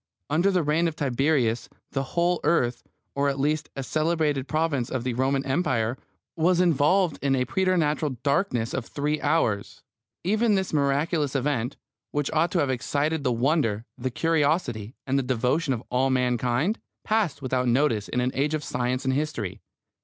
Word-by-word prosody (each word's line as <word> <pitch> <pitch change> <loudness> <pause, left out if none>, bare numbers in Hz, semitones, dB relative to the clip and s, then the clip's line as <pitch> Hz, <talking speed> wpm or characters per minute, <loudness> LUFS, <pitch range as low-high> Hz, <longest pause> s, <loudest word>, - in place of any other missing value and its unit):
Under 170 +6 +3
the 185 -3 +2
reign 155 +3 +2
of 160 - -3
Tiberius 135 -4 +1 0.2
the 135 - -1 0.2
whole 175 +1 +3
earth, 125 -8 +1 0.3
or 140 0 +1
at 140 0 -3
least 150 +2 0
a 135 - -3
celebrated 155 -2 0
province 150 -5 0
of 130 -3 -2
the 125 -1 -1
Roman 135 +2 0
Empire, 130 -5 0 0.4
was 170 +2 +2
involved 175 +1 +3
in 135 -1 +2
a 125 -1 +1
preternatural 155 -7 +1
darkness 140 - 0
of 130 - -3
three 150 +1 -2
hours. 145 -10 0 0.4
Even 215 +4 +2
this 190 -3 -1
miraculous 145 +1 +1
event, 135 -2 -1 0.3
which 145 -1 -2
ought 160 +2 +3
to 180 - 0
have 140 -2 +1
excited 145 +5 -1
the 130 - +1
wonder, 120 -3 +1
the 130 +1 -3
curiosity, 145 - 0
and 135 +1 +1
the - - +1
devotion 130 +4 0
of 120 -2 -2
all 130 +2 +2
mankind, 125 - +1 0.2
passed 210 -11 0
without 130 -1 0
notice 120 -4 +2
in 125 - 0
an 125 +1 0
age 145 +3 0
of 150 - -4
science 125 +1 -2
and 130 - +2
history. 135 -9 -3
140 Hz, 170 wpm, -26 LUFS, 125-160 Hz, 0.4 s, Under